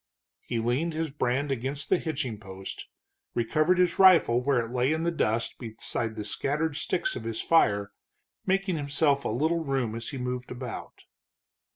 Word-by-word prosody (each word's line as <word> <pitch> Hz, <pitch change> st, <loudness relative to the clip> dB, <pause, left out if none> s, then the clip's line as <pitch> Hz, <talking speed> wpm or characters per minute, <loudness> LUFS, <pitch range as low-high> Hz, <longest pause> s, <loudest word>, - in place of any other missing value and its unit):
He 120 Hz, -, -1 dB
leaned 125 Hz, +9 st, 0 dB
his 160 Hz, -1 st, -2 dB
brand 140 Hz, 0 st, 0 dB
against 135 Hz, +2 st, -2 dB
the 185 Hz, -, +4 dB
hitching 135 Hz, -9 st, -3 dB
post, 95 Hz, -2 st, -8 dB, 0.5 s
recovered 155 Hz, +9 st, +2 dB
his 180 Hz, -2 st, +2 dB
rifle 170 Hz, -11 st, +6 dB
where 125 Hz, -3 st, +2 dB
it 115 Hz, -, -9 dB
lay 125 Hz, +2 st, +1 dB
in 160 Hz, +1 st, -1 dB
the 170 Hz, -, +1 dB
dust 115 Hz, -8 st, -1 dB
beside 115 Hz, -1 st, -4 dB
the 105 Hz, -2 st, -5 dB
scattered 150 Hz, +6 st, -1 dB
sticks 175 Hz, +4 st, -1 dB
of 120 Hz, -, -5 dB
his 115 Hz, 0 st, -3 dB
fire, 100 Hz, -11 st, +3 dB, 0.5 s
making 195 Hz, -2 st, +1 dB
himself 140 Hz, -1 st, +1 dB
a -, -, 0 dB
little 160 Hz, +8 st, +1 dB
room 135 Hz, -6 st, -1 dB
as 115 Hz, 0 st, -5 dB
he 140 Hz, -, -5 dB
moved 125 Hz, 0 st, -4 dB
about. 125 Hz, -1 st, -7 dB
135 Hz, 170 wpm, -28 LUFS, 115-160 Hz, 0.5 s, rifle